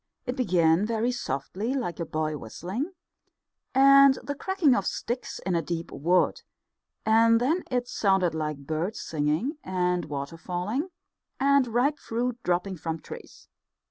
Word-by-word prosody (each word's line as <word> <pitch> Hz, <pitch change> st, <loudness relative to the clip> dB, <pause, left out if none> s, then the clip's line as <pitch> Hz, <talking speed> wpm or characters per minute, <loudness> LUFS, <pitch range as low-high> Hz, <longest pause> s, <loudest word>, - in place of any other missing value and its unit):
It 250 Hz, -1 st, -2 dB
began 175 Hz, -, +3 dB
very 230 Hz, +2 st, 0 dB
softly, 205 Hz, -, -3 dB
like 230 Hz, -11 st, -3 dB
a 170 Hz, -, -3 dB
boy 155 Hz, 0 st, -2 dB
whistling, 185 Hz, -, -5 dB, 0.8 s
and 275 Hz, 0 st, +7 dB
the 285 Hz, -, -3 dB
cracking 335 Hz, -1 st, +2 dB
of 200 Hz, -5 st, 0 dB
sticks 240 Hz, +2 st, -3 dB
in 185 Hz, -, 0 dB
a 170 Hz, -, +2 dB
deep 165 Hz, +1 st, -4 dB
wood, 175 Hz, +5 st, +1 dB, 0.6 s
and 230 Hz, +1 st, +5 dB
then 310 Hz, +9 st, +1 dB
it 245 Hz, -1 st, -1 dB
sounded 190 Hz, -7 st, +2 dB
like 150 Hz, -3 st, -4 dB
birds 160 Hz, +8 st, -2 dB
singing, 160 Hz, -, -1 dB
and 180 Hz, -2 st, 0 dB
water 145 Hz, +2 st, -5 dB
falling, 185 Hz, -, -3 dB, 0.5 s
and 280 Hz, -1 st, +4 dB
ripe 250 Hz, +6 st, +1 dB
fruit 240 Hz, +1 st, -2 dB
dropping 180 Hz, +1 st, -1 dB
from 160 Hz, 0 st, -4 dB
trees. -, -, -11 dB
195 Hz, 140 wpm, -27 LUFS, 165-250 Hz, 0.8 s, and